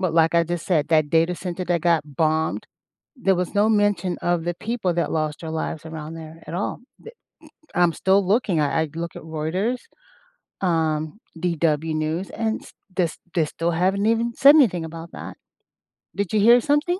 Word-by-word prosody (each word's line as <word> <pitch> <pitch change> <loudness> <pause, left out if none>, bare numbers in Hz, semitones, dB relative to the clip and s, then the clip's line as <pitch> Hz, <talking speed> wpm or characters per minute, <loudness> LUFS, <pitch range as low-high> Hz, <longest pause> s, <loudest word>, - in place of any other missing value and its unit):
But, 180 -4 0
like 165 0 +4
I 170 - +4
just 175 0 -4
said, 155 -5 +1
that 155 -2 +3
data 165 +2 +3
center 180 0 -5
that 175 -1 +1
got 155 -4 0
bombed, 160 0 0 0.5
there 195 -7 +2
was 180 +2 -2
no 205 +2 +4
mention 205 -4 +1
of 175 -2 0
the 175 0 -1
people 215 -4 -2
that 170 - -1
lost 155 -1 -1
their 160 - -6
lives 160 0 -4
around 160 0 -7
there 160 0 -10
at 165 - -6
all. 190 - -3 0.2
Th 460 - -11 0.6
m 175 - +3
I'm 170 -1 +4
still 190 +3 +3
looking, 195 -5 +2
I 150 +2 +1
I 160 - -3
look 170 0 -5
at - - -8
Reuters, 160 +10 -2 0.8
um, 160 -1 0 0.2
DW 160 -2 0
News, 155 +4 -2
and 220 0 -2
st - - -15 0.2
they 180 -3 +2 0.3
they 165 - +3
still 165 +3 -2
haven't 190 +5 +1
even 230 +1 +1
said 285 +2 +7
anything 180 - +3
about 165 +1 -8
that. - - -8 0.8
Did 200 -1 -2
you 215 - +3
hear 235 +4 +6
something? 295 +7 +1
170 Hz, 190 wpm, -23 LUFS, 160-200 Hz, 0.8 s, said